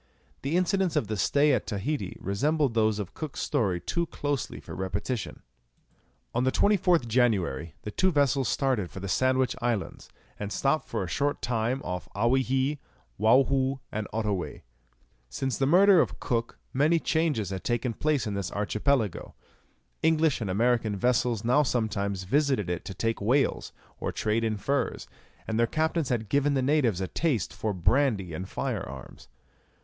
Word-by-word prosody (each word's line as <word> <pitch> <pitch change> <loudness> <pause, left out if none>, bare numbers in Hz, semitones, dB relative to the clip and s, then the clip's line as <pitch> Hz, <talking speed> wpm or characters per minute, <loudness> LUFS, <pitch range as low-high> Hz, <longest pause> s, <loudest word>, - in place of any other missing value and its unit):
The 145 +6 0
incidents 185 -1 +1
of 110 - 0
the 110 - -1
stay 145 +8 +3
at 120 - -1
Tahiti 105 +1 -3
resemble 145 - +1
those 110 -2 +1
of 105 -4 -5
Cook's 155 -3 -6
story 105 - 0
too 170 - -2
closely 145 -4 -3
for - - -10
repetition. 100 +5 -4 0.9
On 120 - +1
the 130 - +2
24th 180 - +3
January 95 - +1
the 105 - -5
two 185 - +2
vessels 140 -4 +2
started 130 -10 0
for - - -8
the 100 - -5
Sandwich 130 +3 +2
Islands, 115 -5 -2 0.3
and 105 0 -4
stopped 135 +5 0
for - - -2
a - - -4
short 145 +9 -1
time 120 +2 -1
off 90 0 -5
Owyhee, 130 +5 +1 0.4
Waohoo, 130 +4 +3
and 110 0 -3
Ottoway. 105 -5 -3 0.7
Since 130 - -3
the 135 - +2
murder 185 +2 +6
of - - -3
Cook 115 -1 -2 0.2
many 150 +5 +3
changes 155 - 0
had 95 -1 -4
taken 120 0 -1
place 150 +1 0
in 105 - -3
this 100 -2 -3
archipelago. 110 +1 -1 0.7
English 160 -4 +2
and 105 - -2
American 115 +1 +1
vessels 120 +1 +1
now 125 +5 +4
sometimes 100 -7 -1
visited 130 - +1
it 90 - -4
to 95 - -6
take 115 +4 -1
whales, 130 +7 +1 0.3
or - - -2
trade 110 +2 0
in 110 -2 0
furs, 140 +7 -1 0.4
and 110 0 -1
their 115 - +4
captains 160 +1 0
had 115 -3 -1
given 140 +5 +2
the 130 - +1
natives 130 - +2
a 95 - -1
taste 140 - -1
for 110 - -2
brandy 100 - +1
and 90 +4 -5
fire - - -2
arms. - - -11
120 Hz, 165 wpm, -27 LUFS, 105-140 Hz, 0.9 s, murder